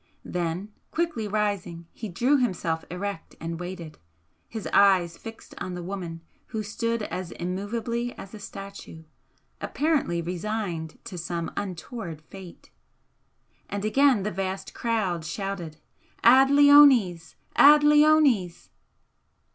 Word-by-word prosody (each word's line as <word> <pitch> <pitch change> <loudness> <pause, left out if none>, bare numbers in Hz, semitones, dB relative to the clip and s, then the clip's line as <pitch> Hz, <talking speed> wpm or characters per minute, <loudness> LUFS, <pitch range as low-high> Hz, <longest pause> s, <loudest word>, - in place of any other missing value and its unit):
Then 180 +4 -3 0.2
quickly 320 -10 -2
rising 200 -5 -2
he 220 - -7
drew 250 +11 +2
himself 170 -9 -1
erect 190 0 -5
and 165 0 -5
waited, 175 -3 -7 0.5
his 220 -2 -6
eyes 185 -4 +4
fixed 225 -1 -11
on 185 - -5
the 175 - -6
woman 175 -3 -6 0.3
who 220 -1 -4
stood 230 +2 -2
as 185 -4 -5
immovably 230 +7 -3
as 195 - -10
a 215 - -8
statue, 195 -5 -10 0.6
apparently 290 - 0
resigned 175 -2 -4
to 190 -6 -7
some 170 0 -4
untoward 185 -2 -6
fate. 185 +1 -13 1.0
And 205 +1 -3
again 260 -1 +3
the 210 - -2
vast 190 +1 -4
crowd 205 -8 -1
shouted 170 -1 -5 0.5
"Ad 260 +3 +7
leones! 280 - +6 0.2
Ad 295 +1 +8
leones!" 295 - +4
195 Hz, 115 wpm, -26 LUFS, 175-230 Hz, 1.0 s, Ad